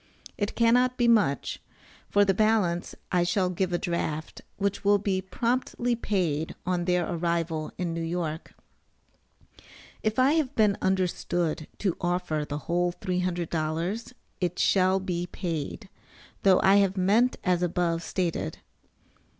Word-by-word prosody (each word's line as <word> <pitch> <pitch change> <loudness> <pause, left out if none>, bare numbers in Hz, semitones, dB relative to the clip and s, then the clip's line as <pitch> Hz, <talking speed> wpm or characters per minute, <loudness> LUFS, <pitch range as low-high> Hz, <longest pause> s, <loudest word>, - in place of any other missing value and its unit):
It 205 -1 -2
cannot 245 +2 +3
be 240 - +3
much; 205 - +2 0.5
for 205 0 +4
the 195 - +3
balance, 205 -5 +1 0.2
I 180 -2 +3
shall 180 +1 +1
give 185 0 -1
a 175 - +1
draft, 165 -3 -3 0.2
which 200 0 -1
will 205 0 +5
be 195 -2 -1
promptly 240 +3 -1
paid 175 -9 -1
on 180 -1 0
their 180 -2 +1
arrival 165 -2 -1
in 175 -2 -2
New 165 - -3
York. 165 -1 -4 1.5
If 215 0 -1
I 260 +2 +5
have 295 -4 0
been 210 -3 +4
understood 175 -4 0
to 190 -5 -1
offer 175 -4 -1
the 145 - -2
whole 175 +1 +1
$300, 175 +3 -2 0.3
it 180 -1 -1
shall 190 0 +3
be 180 -2 -3
paid, 170 +3 -4 0.5
though 190 -2 +5
I 195 +1 +6
have 195 -1 +2
meant 215 +7 +3
as 180 -2 +2
above 170 -1 0
stated. 170 - -2
180 Hz, 135 wpm, -27 LUFS, 170-205 Hz, 1.5 s, I